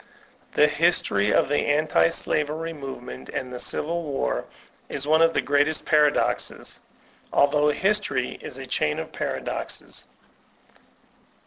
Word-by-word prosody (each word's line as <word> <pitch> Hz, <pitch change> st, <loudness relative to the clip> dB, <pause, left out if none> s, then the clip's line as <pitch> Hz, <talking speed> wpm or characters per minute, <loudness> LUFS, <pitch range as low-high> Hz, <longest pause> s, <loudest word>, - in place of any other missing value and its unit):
The 150 Hz, -, +5 dB
history 145 Hz, -, +2 dB
of -, -, +3 dB
the 145 Hz, +1 st, +1 dB
anti 155 Hz, +2 st, +3 dB
slavery 160 Hz, +1 st, -2 dB
movement 130 Hz, -, -8 dB
and 130 Hz, -1 st, -4 dB
the 125 Hz, -, -5 dB
Civil 170 Hz, +7 st, -1 dB
War 140 Hz, -, -2 dB, 0.4 s
is 140 Hz, -, -4 dB
one 155 Hz, +2 st, +4 dB
of 165 Hz, 0 st, +5 dB
the -, -, +3 dB
greatest 145 Hz, +2 st, +2 dB
of -, -, -22 dB
paradoxes, 150 Hz, -1 st, +1 dB, 0.5 s
although 150 Hz, +1 st, +3 dB
history 190 Hz, -6 st, 0 dB
is 130 Hz, -, -8 dB
a 135 Hz, -, -7 dB
chain 75 Hz, -12 st, 0 dB
of -, -, -5 dB
paradoxes. -, -, -4 dB
150 Hz, 130 wpm, -25 LUFS, 135-160 Hz, 0.5 s, The